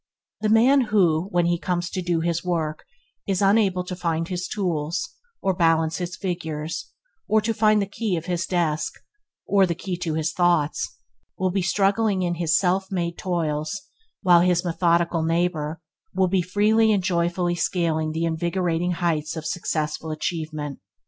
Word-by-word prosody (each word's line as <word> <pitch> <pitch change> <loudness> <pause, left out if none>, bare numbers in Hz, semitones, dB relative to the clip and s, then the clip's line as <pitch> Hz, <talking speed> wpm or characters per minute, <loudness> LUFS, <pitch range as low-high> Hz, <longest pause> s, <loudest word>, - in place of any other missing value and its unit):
The 215 - +1
man 250 +6 +5
who, 180 -6 +2
when 175 -3 +2
he 170 0 +1
comes 175 -1 -2
to 185 - -2
do 175 -2 0
his 170 0 -1
work, 165 -4 -2 0.4
is 195 -2 0
unable 195 -2 +3
to 180 0 -5
find 165 -2 -1
his 180 0 -3
tools, 175 - -2 0.4
or 190 - +2
to - - -12
balance 165 -1 +3
his 180 0 -4
figures, 160 -4 -4 0.4
or 220 - +4
to 225 +2 0
find 215 -1 +4
the 200 - +1
key 200 0 -2
of 165 - -5
his 175 -1 -2
desk, 160 -4 0 0.5
or 195 -2 +4
the 170 - -1
key 185 +1 -4
to 170 -3 -2
his 160 +1 -1
thoughtless, 175 -4 +1 0.4
will 185 0 0
be 195 +1 0
struggling 195 +2 +1
in 175 -1 0
his 165 -2 +2
self 190 +1 0
made 170 -2 -2
toils 160 -1 -2 0.4
while 175 -2 +6
his 180 0 +2
methodical 170 -1 +1
neighbor 165 -1 0 0.4
will 190 0 +3
be 185 0 +2
freely 215 +5 +3
and 200 -3 +1
joyfully 175 -1 0
scaling 165 -2 0
the 165 +1 -1
invigorating 170 +1 0
heights 165 -3 -1
of 160 -1 -6
successful 160 -2 -2
achievement. 155 -2 -4
175 Hz, 170 wpm, -24 LUFS, 165-190 Hz, 0.5 s, while